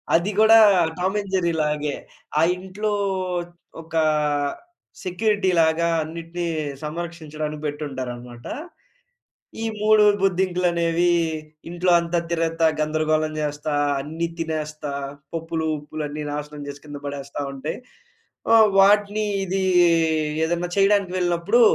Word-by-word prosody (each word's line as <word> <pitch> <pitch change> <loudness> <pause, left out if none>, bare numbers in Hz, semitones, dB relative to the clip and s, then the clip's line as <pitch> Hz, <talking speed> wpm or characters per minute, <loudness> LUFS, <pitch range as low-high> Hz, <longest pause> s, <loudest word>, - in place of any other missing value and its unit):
అది 175 +5 +2
గూడా 220 +1 +8 0.4
'Tom 190 +3 0
and 195 -1 -10
జెర్రీ‌లాగే.' 150 -4 0 0.4
ఆ - - +4 0.2
ఇంట్లో 195 +3 -3 0.9
ఒక 165 0 -10 1.1
సెక్యూరిటీలాగా 180 -4 +2 0.2
అన్నిటిని 165 +2 -5 0.4
సంరక్షించడానికి 155 -2 -5
పెట్టి 150 +1 -3
ఉంటారన్నమాట. 120 -2 -7 1.2
ఈ - - -1 0.2
మూడు 215 0 +5 0.2
బొద్దింకలనేవి 175 -2 +1 0.6
ఇంట్లో 175 +1 +1
అంతా 170 0 -1
తిరుగుతా, 165 0 +1
గందరగోళం 155 0 0
జేస్తా, 150 0 -2 0.3
అన్ని 160 +4 -3
తినేస్తా, 155 -2 -4 0.4
పప్పులు, 165 0 -3
ఉప్పులు 150 +1 -7
అన్నీ 150 +1 -5
నాశనం 150 0 -6
చేసి 145 0 -8
కింద 145 -1 -7
పడేస్తా 140 0 -5
ఉంటాయి. 135 +3 -5 0.8
ఆహ్, 220 -2 +7
వాటిని 205 +2 +4 0.2
ఇది 190 +1 -1 0.8
ఏదైనా 175 +2 -1
చేయడానికి 195 -2 +3
వెళ్ళినప్పుడు 175 +5 +2
165 Hz, 100 wpm, -23 LUFS, 150-185 Hz, 1.2 s, గూడా